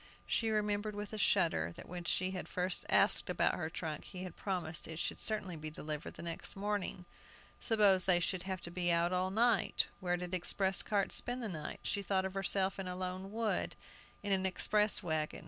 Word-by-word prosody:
She 225 Hz, -, +1 dB
remembered 210 Hz, -1 st, 0 dB
with 205 Hz, +1 st, -5 dB
a 215 Hz, -, -3 dB
shudder 160 Hz, -, +2 dB
that -, -, -10 dB
when 175 Hz, 0 st, -6 dB
she 185 Hz, +3 st, +1 dB
had 185 Hz, -1 st, -5 dB
first 180 Hz, 0 st, -1 dB
asked -, -, +5 dB
about -, -, +2 dB
her 160 Hz, -2 st, -3 dB
trunk, 160 Hz, -2 st, -5 dB
he 185 Hz, -1 st, -7 dB
had 185 Hz, -3 st, -7 dB
promised 175 Hz, -5 st, -2 dB
it 160 Hz, -, -6 dB
should -, -, -2 dB
certainly 205 Hz, -5 st, -2 dB
be 155 Hz, 0 st, -6 dB
delivered 150 Hz, 0 st, -5 dB
the -, -, -8 dB
next 170 Hz, -1 st, -3 dB
morning. 200 Hz, -2 st, -2 dB, 0.5 s
Suppose 200 Hz, -5 st, +4 dB
they 180 Hz, -2 st, +5 dB
should 180 Hz, +1 st, -1 dB
have 190 Hz, 0 st, -4 dB
to 170 Hz, -, -5 dB
be 175 Hz, 0 st, 0 dB
out 170 Hz, +1 st, +2 dB
all 185 Hz, +1 st, +1 dB
night? 225 Hz, 0 st, +2 dB
Where 180 Hz, -2 st, 0 dB
did 180 Hz, 0 st, -6 dB
express 190 Hz, +2 st, +2 dB
carts 200 Hz, -2 st, 0 dB
spend 245 Hz, 0 st, -1 dB
the -, -, -1 dB
night? 155 Hz, -5 st, -5 dB
She 200 Hz, -, -1 dB
thought 190 Hz, -1 st, 0 dB
of 190 Hz, -, -3 dB
herself 195 Hz, 0 st, +1 dB
in 190 Hz, -, -4 dB
a 180 Hz, -, -3 dB
lone 185 Hz, +1 st, -4 dB
wood, 225 Hz, 0 st, -1 dB, 0.5 s
in 205 Hz, -, -1 dB
an 190 Hz, -1 st, +3 dB
express 210 Hz, +3 st, +3 dB
wagon! 155 Hz, -3 st, -1 dB
185 Hz, 205 wpm, -34 LUFS, 175-205 Hz, 0.5 s, asked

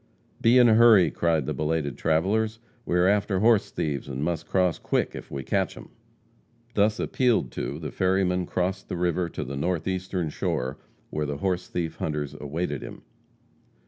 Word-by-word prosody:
"Be 115 Hz, +2 st, +5 dB
in 125 Hz, -1 st, +7 dB
a 110 Hz, -, +6 dB
hurry," 110 Hz, -5 st, +6 dB
cried 80 Hz, -4 st, +1 dB
the -, -, -2 dB
belated 75 Hz, -3 st, -1 dB
travelers. 105 Hz, +8 st, +1 dB, 0.3 s
"We 90 Hz, -, +1 dB
are 90 Hz, -, +4 dB
after 100 Hz, 0 st, +2 dB
horse 110 Hz, 0 st, +4 dB
thieves 70 Hz, -4 st, -3 dB
and 70 Hz, +1 st, -4 dB
must 80 Hz, 0 st, -2 dB
cross 90 Hz, -3 st, +1 dB
quick -, -, -1 dB
if -, -, -8 dB
we 70 Hz, -, -5 dB
catch -, -, -1 dB
them." -, -, -11 dB, 0.8 s
Thus 105 Hz, +1 st, +2 dB
appealed 120 Hz, -, +1 dB
to 70 Hz, +3 st, -4 dB
the 75 Hz, -1 st, -6 dB
ferryman 90 Hz, -1 st, +1 dB
crossed 95 Hz, +2 st, -2 dB
the -, -, -3 dB
river 90 Hz, 0 st, 0 dB
to -, -, -5 dB
the 70 Hz, +2 st, -6 dB
northeastern 90 Hz, +2 st, -2 dB
shore, 65 Hz, -1 st, -2 dB, 0.3 s
where 75 Hz, -1 st, -2 dB
the 70 Hz, 0 st, -3 dB
horse 90 Hz, +2 st, -1 dB
thief 85 Hz, -2 st, -3 dB
hunters 75 Hz, -2 st, -3 dB
awaited 75 Hz, 0 st, -3 dB
him. -, -, -9 dB
90 Hz, 175 wpm, -26 LUFS, 75-95 Hz, 0.8 s, in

